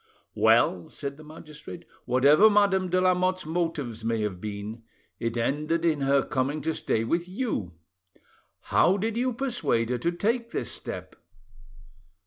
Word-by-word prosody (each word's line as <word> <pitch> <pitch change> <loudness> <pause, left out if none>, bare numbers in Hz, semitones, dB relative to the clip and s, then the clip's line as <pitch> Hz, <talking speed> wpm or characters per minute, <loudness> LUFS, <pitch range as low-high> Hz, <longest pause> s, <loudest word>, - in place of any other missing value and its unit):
"Well," 110 -6 +3
said 140 -1 -6
the 155 - -12
magistrate, 155 +1 -11 0.2
"whatever 140 - +6
Madame 200 -3 +3
de 185 +1 +2
Lamotte's 185 0 +1
motives 155 -9 -3
may 115 -1 0
have 100 -4 -3
been, 105 +2 -6 0.4
it 115 0 -2
ended 150 +7 0
in 155 -4 +1
her 135 0 +3
coming 140 +2 -1
to 160 +3 -1
stay 110 - -1
with 170 +9 -1
you. 185 - -3 1.0
How 190 +3 +5
did 220 +2 -2
you 250 +2 0
persuade 235 - -1
her 125 - -1
to 170 - 0
take 230 +6 -1
this - - -3
step?" - - -7
155 Hz, 145 wpm, -27 LUFS, 120-185 Hz, 1.0 s, whatever